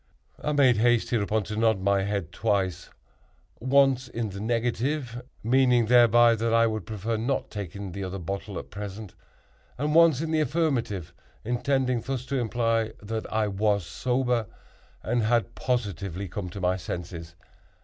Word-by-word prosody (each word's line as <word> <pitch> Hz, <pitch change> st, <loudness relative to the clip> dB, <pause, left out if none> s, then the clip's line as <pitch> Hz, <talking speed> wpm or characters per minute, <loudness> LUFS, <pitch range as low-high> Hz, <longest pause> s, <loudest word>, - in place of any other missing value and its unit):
I 150 Hz, -, 0 dB
made 130 Hz, -5 st, +4 dB
haste, 120 Hz, +1 st, +2 dB
hereupon, 110 Hz, -2 st, +1 dB
to 105 Hz, -, -6 dB
nod 110 Hz, -2 st, +2 dB
my 100 Hz, +1 st, +2 dB
head 100 Hz, -4 st, -2 dB
twice—once 125 Hz, -, -1 dB
in 115 Hz, -3 st, -3 dB
the 100 Hz, -, -7 dB
negative, 120 Hz, +3 st, -1 dB, 0.2 s
meaning 125 Hz, 0 st, +4 dB
thereby 120 Hz, 0 st, +6 dB
that 115 Hz, 0 st, -1 dB
I 115 Hz, 0 st, +5 dB
would 110 Hz, -5 st, -2 dB
prefer 110 Hz, +2 st, -2 dB
not 125 Hz, +5 st, -2 dB
taking 100 Hz, -1 st, -6 dB
the 100 Hz, +3 st, -5 dB
other 95 Hz, +1 st, -4 dB
bottle 100 Hz, +3 st, -5 dB
at -, -, -8 dB
present—and 105 Hz, +7 st, -7 dB
once 165 Hz, -4 st, +6 dB
in 160 Hz, 0 st, -2 dB
the 160 Hz, -, +2 dB
affirmative, 125 Hz, -, -1 dB, 0.3 s
intending 125 Hz, +1 st, 0 dB
thus 130 Hz, 0 st, -4 dB
to 135 Hz, -, -2 dB
imply 115 Hz, -1 st, 0 dB
that 110 Hz, +1 st, -4 dB
I 110 Hz, -1 st, +1 dB
was 100 Hz, -1 st, 0 dB
sober 125 Hz, +4 st, 0 dB, 0.6 s
and 120 Hz, +2 st, 0 dB
had 115 Hz, +1 st, +1 dB
positively 100 Hz, -7 st, -2 dB
come 90 Hz, +1 st, -5 dB
to 100 Hz, -, -8 dB
my 90 Hz, 0 st, +1 dB
senses. 85 Hz, -1 st, -6 dB
115 Hz, 150 wpm, -26 LUFS, 100-125 Hz, 0.6 s, thereby